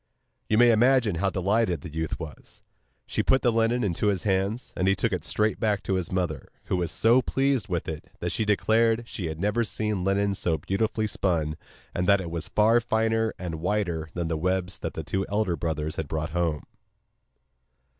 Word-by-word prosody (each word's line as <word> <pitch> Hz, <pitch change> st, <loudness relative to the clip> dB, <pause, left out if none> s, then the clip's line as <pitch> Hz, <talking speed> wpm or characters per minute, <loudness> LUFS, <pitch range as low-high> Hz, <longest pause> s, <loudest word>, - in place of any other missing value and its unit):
You 110 Hz, -, +3 dB
may 120 Hz, 0 st, +7 dB
imagine 115 Hz, -4 st, +3 dB
how 95 Hz, +4 st, +1 dB
delighted 95 Hz, -3 st, +1 dB
the 80 Hz, -2 st, -9 dB
youth 80 Hz, 0 st, -3 dB
was. 80 Hz, -4 st, -10 dB, 0.4 s
She -, -, -1 dB
put 130 Hz, -, +2 dB
the 120 Hz, -, +4 dB
linen 115 Hz, +2 st, +2 dB
into 100 Hz, +1 st, 0 dB
his 100 Hz, -4 st, +1 dB
hands, 100 Hz, +4 st, -1 dB
and 90 Hz, -, 0 dB
he 95 Hz, -, +4 dB
took 115 Hz, +2 st, 0 dB
it 90 Hz, -4 st, -2 dB
straight 105 Hz, +4 st, 0 dB
back 105 Hz, -2 st, 0 dB
to -, -, -1 dB
his 95 Hz, -2 st, -1 dB
mother, 85 Hz, -7 st, -2 dB
who 95 Hz, -, -1 dB
was 85 Hz, -1 st, -1 dB
so 120 Hz, +3 st, +4 dB
pleased 135 Hz, -3 st, 0 dB
with 90 Hz, -3 st, -2 dB
it 80 Hz, -1 st, -6 dB
that -, -, -3 dB
she -, -, 0 dB
declared 115 Hz, +2 st, +2 dB
she 90 Hz, -7 st, -4 dB
had 80 Hz, 0 st, -5 dB
never 105 Hz, +5 st, +1 dB
seen 105 Hz, -3 st, -2 dB
linen 100 Hz, +1 st, +1 dB
so 85 Hz, -4 st, 0 dB
beautifully 110 Hz, +7 st, -1 dB
spun, 85 Hz, -7 st, 0 dB, 0.4 s
and 90 Hz, +2 st, 0 dB
that 100 Hz, 0 st, +6 dB
it 85 Hz, -3 st, -5 dB
was 85 Hz, -1 st, -4 dB
far 110 Hz, +3 st, +4 dB
finer 110 Hz, -1 st, +1 dB
and 80 Hz, -3 st, -5 dB
whiter 85 Hz, -4 st, -1 dB
than 85 Hz, -1 st, -1 dB
the 80 Hz, -1 st, -1 dB
webs 90 Hz, +2 st, -1 dB
that -, -, -5 dB
the -, -, -4 dB
two 95 Hz, 0 st, -1 dB
elder 105 Hz, -3 st, 0 dB
brothers 80 Hz, 0 st, -3 dB
had 80 Hz, -, -3 dB
brought 75 Hz, +1 st, -3 dB
home. 85 Hz, -3 st, -1 dB
95 Hz, 200 wpm, -26 LUFS, 85-110 Hz, 0.4 s, may